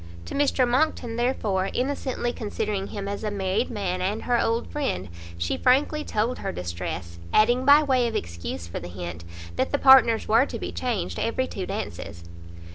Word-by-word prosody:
To -, -, -7 dB
Mr 275 Hz, -3 st, +2 dB
Monckton 245 Hz, -3 st, +1 dB
therefore, 215 Hz, -6 st, 0 dB
innocently 260 Hz, -2 st, -1 dB
considering 210 Hz, -2 st, -3 dB
him 200 Hz, -1 st, -5 dB
as 200 Hz, +1 st, -4 dB
a 215 Hz, -, 0 dB
married 200 Hz, +3 st, -1 dB
man 190 Hz, -5 st, -2 dB
and 205 Hz, +4 st, -1 dB
her 240 Hz, -1 st, +2 dB
old 230 Hz, +1 st, 0 dB
friend, 95 Hz, -, -2 dB, 0.3 s
she 85 Hz, 0 st, -1 dB
frankly 290 Hz, +4 st, +2 dB
told 225 Hz, +1 st, -1 dB
her -, -, -3 dB
distress, 85 Hz, -1 st, -5 dB
adding, 240 Hz, +4 st, +4 dB
by 290 Hz, +2 st, +7 dB
way 260 Hz, -4 st, +2 dB
of 230 Hz, -, -4 dB
excuse 85 Hz, 0 st, -4 dB
for 85 Hz, -, -6 dB
the 85 Hz, -, -8 dB
hint, 85 Hz, -2 st, -7 dB, 0.3 s
that -, -, 0 dB
the 285 Hz, -, +2 dB
partners 265 Hz, -5 st, +6 dB
were 230 Hz, +6 st, +4 dB
to -, -, -5 dB
be 90 Hz, -1 st, -5 dB
changed 85 Hz, +1 st, -2 dB
every 245 Hz, +3 st, 0 dB
two 195 Hz, -7 st, -5 dB
dances. 85 Hz, -, -5 dB
215 Hz, 180 wpm, -25 LUFS, -, 0.3 s, by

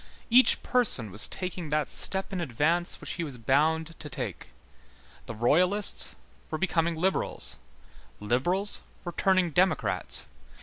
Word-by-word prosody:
Each 255 Hz, +2 st, +5 dB
person 190 Hz, -, +2 dB
was 105 Hz, +3 st, 0 dB
taking 180 Hz, -3 st, -6 dB
that 150 Hz, 0 st, -1 dB
step 195 Hz, +1 st, +5 dB
in 185 Hz, -, -3 dB
advance 165 Hz, +5 st, -1 dB
which -, -, -7 dB
he 170 Hz, -, -4 dB
was 140 Hz, -6 st, -7 dB
bound 155 Hz, +7 st, 0 dB
to 150 Hz, -, -8 dB
take. -, -, -6 dB, 0.8 s
The 115 Hz, -, -7 dB
Royalists 180 Hz, -, +2 dB, 0.3 s
were 155 Hz, -, -3 dB
becoming 170 Hz, -2 st, -1 dB
liberals, 185 Hz, -, -1 dB, 0.6 s
liberals 175 Hz, -, -1 dB, 0.2 s
were 175 Hz, -, -4 dB
turning 185 Hz, 0 st, +1 dB
democrats. 185 Hz, +4 st, +1 dB
170 Hz, 130 wpm, -27 LUFS, 145-185 Hz, 0.8 s, Each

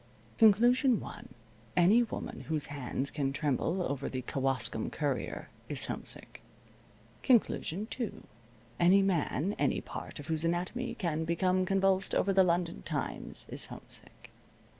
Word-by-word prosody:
Conclusion 240 Hz, +3 st, +5 dB
one: -, -, -9 dB, 0.5 s
Any 195 Hz, +7 st, +6 dB
woman 235 Hz, -, -5 dB
whose 155 Hz, -2 st, 0 dB
hands 135 Hz, 0 st, -3 dB
can 140 Hz, -3 st, -1 dB
tremble 150 Hz, +5 st, 0 dB
over 140 Hz, -3 st, -2 dB
the 130 Hz, -1 st, -4 dB
Kewaskum 125 Hz, -4 st, -1 dB
Courier 145 Hz, -4 st, -2 dB, 0.2 s
is -, -, -2 dB
homesick. -, -, -6 dB, 0.8 s
Conclusion 215 Hz, -6 st, +2 dB
two: 235 Hz, -1 st, -5 dB, 0.6 s
Any 190 Hz, +3 st, +6 dB
man, 185 Hz, 0 st, 0 dB
any -, -, +2 dB
part -, -, -8 dB
of 145 Hz, -, -8 dB
whose 160 Hz, +1 st, -1 dB
anatomy 175 Hz, +9 st, -1 dB
can 165 Hz, -6 st, -1 dB
become 185 Hz, +3 st, +1 dB
convulsed 195 Hz, 0 st, +2 dB
over 195 Hz, -, +2 dB
the 190 Hz, 0 st, +6 dB
London 175 Hz, -, 0 dB
Times -, -, -2 dB
is -, -, 0 dB
homesick. -, -, -7 dB
175 Hz, 130 wpm, -31 LUFS, 145-195 Hz, 0.8 s, Any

